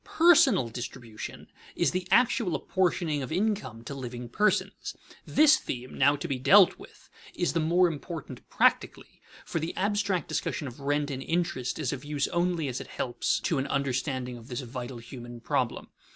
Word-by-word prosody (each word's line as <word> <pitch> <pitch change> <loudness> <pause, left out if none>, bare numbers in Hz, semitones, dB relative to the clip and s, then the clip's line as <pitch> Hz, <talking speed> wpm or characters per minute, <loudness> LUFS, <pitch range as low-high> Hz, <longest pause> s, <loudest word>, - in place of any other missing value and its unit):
Personal 310 - +6
distribution 120 -1 -7 0.3
is - - +2
the 180 0 -3
actual 230 -6 +3
apportioning 170 -5 0
of 130 - -5
income 170 - -1
to 140 - -6
living 125 -3 -6
persons. 210 - 0 0.3
This 305 0 +6
theme 125 0 -6
now 140 +2 +4
to 145 +4 -5
be 135 -4 -2
dealt 180 +9 +6
with - - -15 0.3
is 175 - 0
the 165 - +1
more 175 +3 +4
important 155 -4 -6
practically, - - +1 0.2
for 165 - -2
the 160 +2 -4
abstract 200 -2 0
discussion 145 - -2
of 125 +2 -9
rent 145 +1 0
and 135 -1 -4
interest 160 -7 -1
is 145 -4 -1
of 135 0 -6
use 145 -1 -1
only 175 -3 0
as 130 -1 -3
it - - -9
helps 120 -1 -1
to 160 -6 0
an 135 - -2
understanding 130 -2 -2
of 115 - -14
this 130 0 -4
vital 125 0 -6
human 120 0 -9
problem. - - -2
145 Hz, 170 wpm, -28 LUFS, 125-180 Hz, 0.3 s, Personal